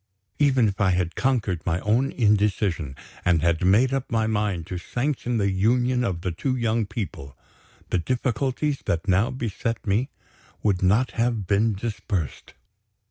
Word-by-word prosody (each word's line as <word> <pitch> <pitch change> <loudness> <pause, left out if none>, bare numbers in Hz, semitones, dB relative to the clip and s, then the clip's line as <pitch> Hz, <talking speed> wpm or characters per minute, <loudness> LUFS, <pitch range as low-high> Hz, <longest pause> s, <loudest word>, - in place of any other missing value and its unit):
Even 135 -5 +4
if 100 +1 -3
I 95 - +4
had 90 -1 0
conquered 110 -10 0
my 85 0 0
own 120 +6 +1
indecision, 100 - +1 0.3
and 85 -3 +2
had 85 0 +2
made 110 +8 +4
up 135 -1 -2
my 110 -1 +2
mind 105 -6 -1
to 90 +1 -5
sanction 125 +3 -2
the 100 -2 +1
union 125 +6 +2
of 95 -7 -2
the 90 - -2
two 130 +10 -1
young 115 -3 0
people, 95 - -6 0.5
the 90 - +2
difficulties 130 - -1
that 85 +2 -1
now 100 +6 +3
beset 115 -3 -3
me 110 +7 +1 0.5
would 100 -4 +1
not 105 +7 +3
have 115 -3 0
been 105 +3 +2
dispersed. 100 - -4
105 Hz, 155 wpm, -24 LUFS, 95-125 Hz, 0.5 s, Even